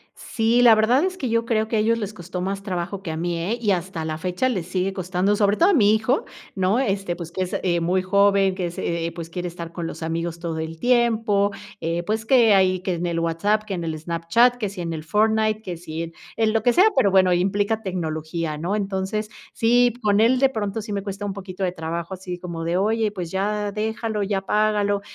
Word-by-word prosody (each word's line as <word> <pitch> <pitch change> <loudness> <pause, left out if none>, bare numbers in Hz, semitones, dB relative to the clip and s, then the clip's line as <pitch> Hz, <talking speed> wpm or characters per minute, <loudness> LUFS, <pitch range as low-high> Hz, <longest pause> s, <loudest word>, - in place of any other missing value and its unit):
Sí, 230 +2 +1
la 235 -2 +8
verdad 235 +7 +3
es 370 0 -3
que 255 -7 -3
yo 230 0 +1
creo 220 -2 +1
que 225 - 0
a - - +2
ellos 230 +2 +2
les 210 -2 -4
costó 180 -2 -6
más 195 +2 -3
trabajo 185 0 -4
que 165 -4 -5
a 160 - -4
mí, 170 0 -2
¿eh?, 205 +8 -1
y 210 -3 +2
hasta 175 -2 -2
la 155 0 -3
fecha, 180 +9 -1
les 185 -8 -3
sigue 185 +1 -1
costando, 185 +2 0
sobre 205 0 +3
todo 355 - +5
a - - +4
mi 215 -7 +5
hijo, 245 +6 0 0.3
¿no?, 190 +5 +1
este, 195 -7 -1
pues 170 -1 -8
que 185 - -4
es, 180 - -4
eh, 175 -2 +1
muy 180 +3 +1
joven, 200 0 +3
que 185 -2 -2
es, 170 - -9
eh 170 -1 -2
eh, 170 - -2
pues, 165 -1 -7
quiere 180 0 -4
estar 170 -1 -7
con 170 -1 -4
los - - -7
amigos 165 +1 -3
todo 165 -2 -4
el 160 0 -5
tiempo, 225 -5 +2 0.3
eh, 170 +1 -2
pues, 220 +4 -2
que 235 -3 +5
ahí 185 -2 +3
que 185 -1 -1
en 175 +1 -3
el 170 -1 -1
WhatsApp, 200 +6 +1
que 210 -2 -5
en 170 -2 -3
el 160 -1 -3
Snapchat, 170 +10 +2
que 215 -4 -2
si 190 -2 -7
en 170 - -3
el 155 - -5
Fortnite, 215 +3 +2
que 180 -5 -6
si 165 -1 -5
en 165 0 -8 0.2
en 220 -1 +2
lo 225 - +2
que 245 +1 +3
sea, 375 - +6
pero 200 - +4
bueno, 185 -1 +5
implica 200 +4 +1
tecnología, 160 -4 -3
¿no? 175 +6 -2
Entonces, 205 +1 -2 0.2
sí, 240 +1 +3
con 205 -2 +2
él, 245 +3 +4
de 270 0 +4
pronto 215 -2 -3
sí 210 - -8
me 200 - -2
cuesta 200 0 -5
un 200 - -3
poquito 190 -1 -6
de 180 - +1
trabajo 170 +1 -5
así 180 -1 -6
como 170 -2 -6
de: 170 +1 0
"Oye, 215 +2 +1
pues, 180 -5 -6
ya 205 +1 -1
déjalo, 220 0 -2
ya 195 0 0
apágalo", 205 0 +1
195 Hz, 245 wpm, -23 LUFS, 175-215 Hz, 0.3 s, la